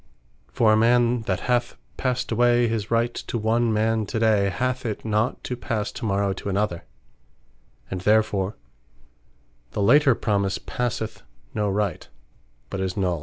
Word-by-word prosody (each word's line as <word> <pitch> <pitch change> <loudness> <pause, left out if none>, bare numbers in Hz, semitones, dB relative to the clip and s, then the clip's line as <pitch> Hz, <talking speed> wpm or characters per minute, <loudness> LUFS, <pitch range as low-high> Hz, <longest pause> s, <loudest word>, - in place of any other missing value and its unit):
For 110 -2 +4
a - - +4
man 120 +1 +3
that - - 0
hath 120 -1 0 0.2
passed 130 -1 -2
away 120 +1 +3
his 110 -2 -2
Right 115 +1 +1
to - - -4
one 115 +1 +1
man 110 0 +1
to 115 - -3
day, 110 -3 +3
hath 130 +5 -2
it 110 -3 -4
not 110 +3 0
to 125 - -3
passe 110 -3 -3
to 120 - -5
morrow 100 -1 +1
to 100 - -6
another: 95 -3 -1 1.1
and 95 -1 -3
therefore 105 -1 +2 1.2
the - - -1
later 135 +4 +5
promise 100 -4 0
passeth 120 -3 -3 0.3
no 105 -1 0
Right, 100 -3 -2 0.6
but 95 - -3
is 95 0 -2
null. 90 -4 0
110 Hz, 155 wpm, -24 LUFS, 100-120 Hz, 1.2 s, later